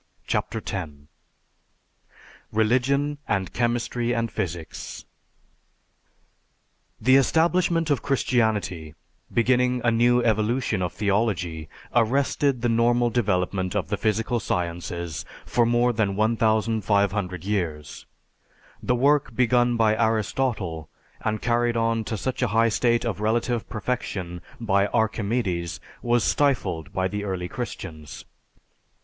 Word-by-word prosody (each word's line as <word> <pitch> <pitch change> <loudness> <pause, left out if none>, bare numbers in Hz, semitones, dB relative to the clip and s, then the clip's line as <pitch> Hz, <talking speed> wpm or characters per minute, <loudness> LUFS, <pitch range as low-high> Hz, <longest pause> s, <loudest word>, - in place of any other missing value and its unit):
CHAPTER 110 - -2
X 95 -5 -2 1.6
RELIGION 130 +6 +1
AND 95 -3 -1
CHEMISTRY 120 0 0
AND 115 -1 -1
PHYSICS 85 -2 -5 1.9
The 130 +1 +5
establishment 165 +3 +2
of 140 - +1
Christianity, 110 - 0 0.4
beginning 125 +1 +2
a 120 - +3
new 120 +2 +4
evolution 110 -1 +1
of 90 - -1
theology, 95 -5 -1 0.2
arrested 130 +2 +1
the - - +3
normal 120 +1 +3
development 95 -4 0
of 95 -5 -1
the 105 - 0
physical 115 +3 0
sciences 85 -3 -3 0.2
for 120 -1 +2
more 120 +1 +3
than 105 -3 0
1500 105 -4 +1
years. 85 -8 -3 0.7
The 125 - +1
work 140 -1 +2
begun 120 0 +3
by 110 -1 +3
Aristotle 110 -6 -1 0.3
and 110 -1 -1
carried 120 0 +1
on 115 0 +1
to 110 - -3
such 130 +5 -3
a 125 - +3
high 115 +2 +3
state 120 +2 +1
of 115 -4 -2
relative 115 +2 0
perfection 100 -6 -3 0.2
by 100 -3 +2
Archimedes, 105 -5 -1 0.2
was 120 -1 +2
stifled 100 - 0
by 95 -2 0
the 105 +1 -4
early 95 -3 -3
Christians. 80 -3 -7
110 Hz, 110 wpm, -25 LUFS, 95-120 Hz, 1.9 s, The